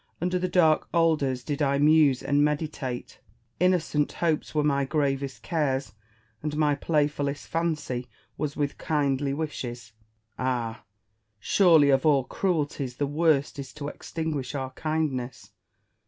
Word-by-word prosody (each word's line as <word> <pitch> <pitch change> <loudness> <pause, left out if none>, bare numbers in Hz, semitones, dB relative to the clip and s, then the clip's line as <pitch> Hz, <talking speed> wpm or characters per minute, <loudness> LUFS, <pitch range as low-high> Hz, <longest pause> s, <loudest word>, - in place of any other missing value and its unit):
Under 180 +1 0
the 185 - 0
dark 165 -4 +3
alders 150 -7 +2
did 145 +1 -3
I 140 -1 +2
muse 145 -2 +4
and 145 0 +2
meditate. 150 -4 -3 0.4
Innocent 170 -5 +1
hopes 160 -2 -1
were 150 - +3
my 140 -2 +2
gravest 135 -1 -1
cares, 140 - -1 0.5
and 150 0 -3
my 150 -1 +3
playfullest 145 -1 -1
fancy 150 -7 -2 0.3
was 145 -1 -3
with 145 -1 -2
kindly 140 -3 0
wishes. 120 -7 -5 0.5
Ah! 120 -3 -2 0.6
surely 160 - +5
of 135 0 +3
all 145 -4 +4
cruelties 145 -6 -2
the 145 - 0
worst 145 -1 +1
is 135 -1 -6
to 145 -1 -5
extinguish 150 -5 -4
our 130 -1 -3
kindness. 140 -5 -3
145 Hz, 130 wpm, -26 LUFS, 135-155 Hz, 0.6 s, surely